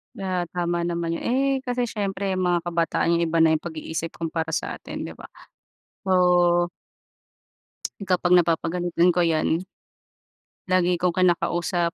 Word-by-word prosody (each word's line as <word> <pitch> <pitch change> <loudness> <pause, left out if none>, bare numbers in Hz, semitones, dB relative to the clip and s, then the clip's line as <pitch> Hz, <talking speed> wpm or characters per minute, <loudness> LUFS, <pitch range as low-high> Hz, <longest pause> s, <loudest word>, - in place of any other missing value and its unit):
Ah, 185 -2 -2
tama 175 -1 -1
naman 170 -1 -2
yun. - - -9
Eh, 260 +3 +2 0.2
kasi 245 0 0
siyempre, 200 -4 -2
mga 175 -2 +1
kabataan 170 -1 0
yung - - +2
iba 165 +1 0
na 160 - +5
yung 160 - +2
pag-iisip 160 0 -5
kumpara 165 0 -3
sa - - -4
atin, - - -7
‘di - - -6
ba? - - -12 0.8
So 175 -1 +3 1.3
Kapag 180 -1 +2
napapagalitan 175 0 +2
ko 175 - +3
yan 165 +1 +1 1.1
lagi 180 -1 +2
kong 180 0 0
kinakausap. 175 -1 +1
175 Hz, 135 wpm, -24 LUFS, 170-180 Hz, 1.3 s, na